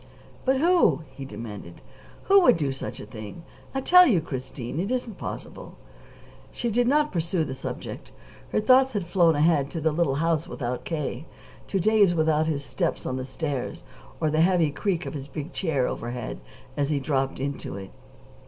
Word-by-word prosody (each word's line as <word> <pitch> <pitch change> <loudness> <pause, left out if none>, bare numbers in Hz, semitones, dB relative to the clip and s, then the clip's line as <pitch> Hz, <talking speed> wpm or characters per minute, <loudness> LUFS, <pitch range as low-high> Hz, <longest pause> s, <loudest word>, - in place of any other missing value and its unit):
"But 265 0 +3
who?" 340 - +4
he 135 +1 -8
demanded. 105 -6 -8 0.4
"Who 395 0 +6
would 345 - +6
do 145 -4 0
such 135 - -6
a - - -7
thing? 110 +8 -9 0.3
I 270 - 0
tell 360 +5 +7
you, 200 - +4
Christine, 130 -2 -5
it 195 +4 -1
isn't 245 -5 -3
possible." - - -7 0.8
She 235 - -2
did 240 +2 +2
not 300 +3 +3
pursue 170 -1 0
the 130 - -5
subject. 135 - -7 0.4
Her - - +1
thoughts 260 +3 +5
had 200 -4 -1
flown 170 -2 +3
ahead 145 -2 +3
to 165 - -4
the 160 0 +1
little 150 -3 +1
house 165 +1 0
without 125 -7 -4
K., 150 -3 -3 0.4
to 195 - 0
days 205 -2 +4
without 160 -1 +2
his 140 -3 -2
steps 130 0 -2
on 130 - -2
the 130 - -3
stairs 135 - -4 0.4
or 155 -2 +1
the 155 +1 +3
heavy 170 -3 +3
creak 175 +3 -1
of - - -5
his 140 -2 -6
big 145 +2 -6
chair 145 -9 0
overhead 120 0 -5 0.4
as 140 -1 0
he 150 -2 +1
dropped 135 -1 -1
into 140 +1 -4
it. 95 -1 -9
155 Hz, 180 wpm, -26 LUFS, 135-190 Hz, 0.8 s, tell